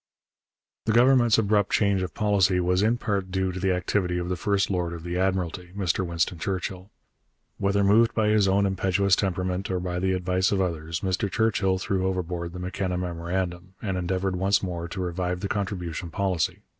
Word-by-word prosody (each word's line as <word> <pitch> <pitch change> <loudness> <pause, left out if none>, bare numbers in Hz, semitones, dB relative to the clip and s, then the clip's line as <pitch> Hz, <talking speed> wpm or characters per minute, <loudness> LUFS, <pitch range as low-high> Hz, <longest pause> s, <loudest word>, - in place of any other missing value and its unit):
The 110 - +1
Government's 120 -1 +5
abrupt 105 -2 +2
change 100 -2 +2
of 90 -3 -4
policy 100 -3 +2
was 90 +1 +2
in 115 +3 +2
part 100 -5 -2
due 95 0 -1
to 90 - -5
the 95 0 +1
activity 90 0 0
of 90 0 -3
the 90 - 0
first 100 +2 0
lord 90 -2 -1
of 85 -1 -8
the 85 0 -4
Admiralty, 90 -2 -1
Mr 95 -1 0
Winston 85 0 -1
Churchill. 95 +1 -4 0.7
Whether 100 +1 +2
moved 115 +4 +4
by 110 -2 +2
his 105 -2 +4
own 100 +1 +3
impetuous 95 0 +2
temperament 95 0 -2
or 95 -1 0
by 90 0 -3
the 95 +1 +1
advice 90 +1 +1
of 100 - +1
others, 85 -2 -2
Mr 95 +1 -1
Churchill 105 -4 +1
threw 95 0 -1
overboard 90 -2 -3
the 90 - -6
M'Kenna 90 0 -2
memorandum, 90 +1 -3
and 95 -3 -3
endeavoured 95 +1 -1
once 100 +2 +2
more 85 -2 -3
to 95 - -7
revive 90 0 -2
the 100 - -2
contribution 95 -4 -3
policy. 90 -1 -1
95 Hz, 185 wpm, -26 LUFS, 90-100 Hz, 0.7 s, Government's